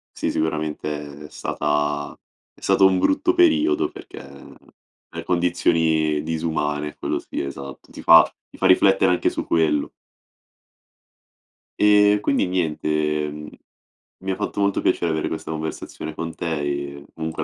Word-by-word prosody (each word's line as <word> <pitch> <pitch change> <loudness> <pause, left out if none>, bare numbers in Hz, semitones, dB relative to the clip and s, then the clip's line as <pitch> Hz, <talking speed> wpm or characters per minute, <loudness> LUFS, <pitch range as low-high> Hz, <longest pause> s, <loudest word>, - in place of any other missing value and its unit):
Sì, - - -2
sicuramente 75 -2 -3
è - - -12
stata 75 0 -2 0.4
è - - -23
stato 95 - +4
un 95 -1 +4
brutto 300 - +2
periodo 350 +1 +3
perché 390 -1 -11 0.9
per 85 0 -7
condizioni 80 -3 +1
disumane 75 -2 -2
quello - - -2
sì - - -5
esatto, 70 -1 -8
ti - - -10
fa 80 0 +9 0.2
ti - - -17
fa 95 - +3
riflettere 95 0 +4
anche 90 - +1
su - - -5
quello. 80 -3 +1 1.9
E 105 0 +5
quindi 135 - +1
niente, 85 -5 -2
ehm. 75 0 -1 0.7
Mi 95 0 -3
ha - - -1
fatto 105 0 -4
molto 100 -1 +1
piacere 85 -2 +1
avere 80 -1 -1
questa 80 0 -5
conversazione 80 0 -6
con 85 -1 -5
te, - - -6
e 70 0 -4
comunque 80 -1 -3
80 Hz, 140 wpm, -22 LUFS, 75-95 Hz, 1.9 s, fa